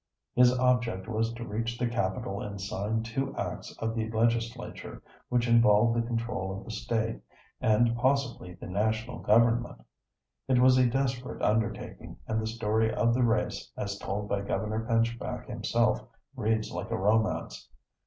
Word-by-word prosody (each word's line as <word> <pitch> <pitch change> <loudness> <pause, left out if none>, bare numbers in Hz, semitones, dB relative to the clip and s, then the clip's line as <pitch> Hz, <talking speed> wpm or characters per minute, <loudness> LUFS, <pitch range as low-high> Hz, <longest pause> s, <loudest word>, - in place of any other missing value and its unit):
His 125 0 +6
object 125 -6 +1
was 115 0 0
to 115 0 -6
reach 115 +2 -3
the 120 - 0
capital 100 -3 -2
and 100 -1 -6
sign 105 +3 -2
two 135 +4 -3
acts - - -4
of 115 0 -2
the 110 -1 -2
legislature, 115 +1 -2 0.3
which 125 -1 +1
involved 115 -1 +5
the 120 - +2
control 115 -5 -2
of - - -9
the - - -7
State 110 0 -2 0.4
and 115 +2 +3
possibly 125 -7 0
the 90 - -10
national 110 +5 -1
government. 115 +2 +3 0.7
It 130 -1 +3
was 130 +1 +6
a 125 -1 +4
desperate 130 0 -2
undertaking, 110 0 -1
and 110 0 -1
the 110 - -2
story 110 0 +1
of 115 +1 +2
the 125 - +1
race, 115 -2 0
as 100 0 -3
told 105 +1 -3
by 100 -1 -1
Governor 105 +3 -2
Pinchback 115 0 0
himself, - - +1 0.3
reads 110 -2 0
like 110 - -5
a 115 - -1
romance. 105 +3 0
115 Hz, 155 wpm, -29 LUFS, 105-120 Hz, 0.7 s, His